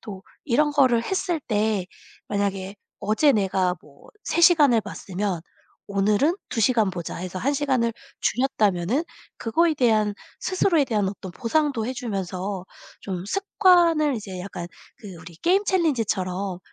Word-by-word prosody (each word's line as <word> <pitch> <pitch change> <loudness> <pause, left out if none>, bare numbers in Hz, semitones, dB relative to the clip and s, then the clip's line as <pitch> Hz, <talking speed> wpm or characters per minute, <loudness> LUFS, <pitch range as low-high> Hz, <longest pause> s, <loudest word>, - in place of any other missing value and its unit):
또 195 -3 -8 0.2
이런 295 +3 +2
거를 255 -5 +4
했을 350 0 -1
때 210 -3 0 0.4
만약에 200 -1 -2 0.2
'어제 250 +8 +3
내가 190 -4 +1
뭐 140 -1 -19
3 340 - -1
시간을 295 -10 +6
봤으면 195 -3 -4 0.5
오늘은 205 - +2
2 225 - -2
시간 225 -2 +3
보자.' 175 -3 -6
해서 185 +1 -5
1 275 +9 0
시간을 260 -5 +1 0.3
줄였다면은 225 - +1 0.3
그거에 320 +8 +1
대한 215 -5 +2 0.3
스스로에 350 -5 +2
대한 210 -6 0
어떤 190 -2 -7
보상도 250 - 0
해주면서 195 -6 -4 0.4
좀 185 -2 -5
습관을 345 - +3
이제 195 -5 -6
약간 180 -2 -6 0.3
그 195 -4 -10
우리 170 0 -12
게임 380 - +2
챌린지처럼 200 - 0
220 Hz, 275 characters per minute, -24 LUFS, 190-290 Hz, 0.5 s, 시간을